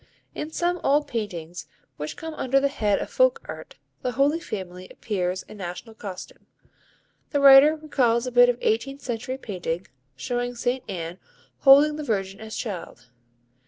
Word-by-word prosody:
In 300 - -5
some 350 +2 -1
old 290 +2 +3
paintings 175 -7 -5 0.3
which 150 +1 -5
come 320 0 -6
under 270 -2 +1
the 280 +1 +1
head 210 -7 +1
of - - -5
Folk - - +3
Art, - - -9 0.3
the 250 - -2
Holy 285 +5 +2
Family 185 - -7
appears 185 -3 -3
in 215 - -13
national 185 +4 -7
costume. 200 -4 -9 0.8
The 285 - 0
writer 280 +2 +8
recalls 255 -6 +1
a 255 - -4
bit 245 0 +6
of 245 - 0
eighteenth 275 +6 -1
century 255 +1 -4
painting, 180 -7 -4 0.3
showing 245 - -3
St. 245 +2 -1
Anne 175 -1 -5 0.4
holding 290 +2 +6
the 305 - -4
Virgin 195 -6 -2
as 220 0 -7
child. 165 - -7
240 Hz, 160 wpm, -25 LUFS, 190-275 Hz, 0.8 s, writer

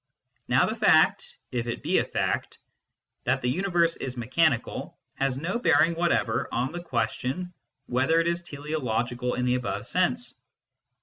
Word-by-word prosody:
Now - - +4
the - - -2
fact - - +3
if 120 -1 -2
it 120 +1 -4
be - - +3
a - - +2
fact - - -2 0.7
that 130 +2 +2
the 125 - +1
universe 175 -1 +1
is 130 -1 -5
mechanical 125 +1 0 0.2
has 135 -1 -1
no 180 - -2
bearing 160 -5 +4
whatever 165 -9 0
on 125 +3 -1
the 175 +1 -5
question 170 +3 -2 0.3
whether 135 +7 +2
it 165 - +1
is 170 0 0
teleo 150 -1 -5
logical 120 +1 -1
in 125 - -1
the 125 - +2
above 125 -1 -2
sense. - - 0
135 Hz, 160 wpm, -27 LUFS, 125-170 Hz, 0.7 s, Now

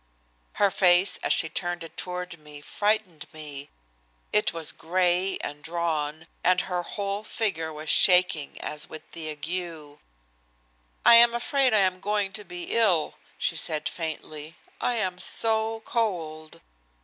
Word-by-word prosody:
Her 200 -1 +2
face 180 +1 +4
as - - -3
she - - +4
turned 175 +1 -3
it 165 - -11
toward 180 -2 -5
me 150 -1 -13
frightened 205 -2 -1
me. 145 -2 -9 0.6
It 210 - +3
was 165 -2 -4
gray 180 +2 0
and 150 +1 -7
drawn, 160 -2 -3 0.2
and 180 0 +4
her 180 -1 -3
whole 200 +3 -4
figure 195 -8 -1
was 155 0 -4
shaking 180 -5 +4
as 150 0 -4
with 155 - -9
the 160 -2 -6
ague. 155 -1 -6 1.1
"I - - +9
am 235 0 +8
afraid 260 0 +2
I 210 - +5
am 185 -1 +1
going 205 -1 -1
to 210 - -5
be 175 -2 -6
ill," 195 -9 +2 0.2
she - - -1
said 155 -1 -1
faintly. 155 -1 -6 0.3
"I 245 - +1
am 185 -5 -1
so 225 +3 -1
cold." 165 -10 -3
175 Hz, 145 wpm, -26 LUFS, 155-200 Hz, 1.1 s, I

